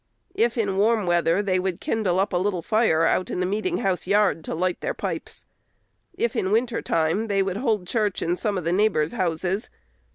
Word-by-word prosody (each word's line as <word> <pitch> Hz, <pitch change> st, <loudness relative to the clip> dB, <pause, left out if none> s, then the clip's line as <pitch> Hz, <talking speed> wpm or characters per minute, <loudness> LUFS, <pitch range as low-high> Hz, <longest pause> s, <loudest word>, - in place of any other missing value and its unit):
If 235 Hz, +1 st, +1 dB
in 200 Hz, -4 st, 0 dB
warm 215 Hz, 0 st, +2 dB
weather, 175 Hz, +2 st, +2 dB
they 185 Hz, -2 st, +1 dB
would 185 Hz, -2 st, -2 dB
kindle 195 Hz, -5 st, 0 dB
up 195 Hz, +1 st, 0 dB
a -, -, +2 dB
little 185 Hz, -2 st, -1 dB
fire 215 Hz, -7 st, +2 dB
out 185 Hz, -, +1 dB
in -, -, -3 dB
the 185 Hz, -, +1 dB
meeting 215 Hz, -, -1 dB
house 190 Hz, -5 st, -1 dB
yard, 200 Hz, -4 st, +2 dB
to -, -, -3 dB
light 180 Hz, +2 st, -1 dB
their -, -, -2 dB
pipes. -, -, -5 dB, 0.7 s
If 235 Hz, -, -1 dB
in 190 Hz, -, 0 dB
winter 230 Hz, +1 st, +1 dB
time, 165 Hz, +8 st, 0 dB
they 200 Hz, -2 st, +1 dB
would 190 Hz, 0 st, -3 dB
hold 220 Hz, -6 st, 0 dB
church 210 Hz, 0 st, -1 dB
in 170 Hz, +1 st, 0 dB
some 205 Hz, +1 st, -1 dB
of 180 Hz, -, -3 dB
the 170 Hz, +2 st, 0 dB
neighbors' 185 Hz, -6 st, +2 dB
houses. 185 Hz, -1 st, -1 dB
195 Hz, 205 wpm, -24 LUFS, 180-215 Hz, 0.7 s, warm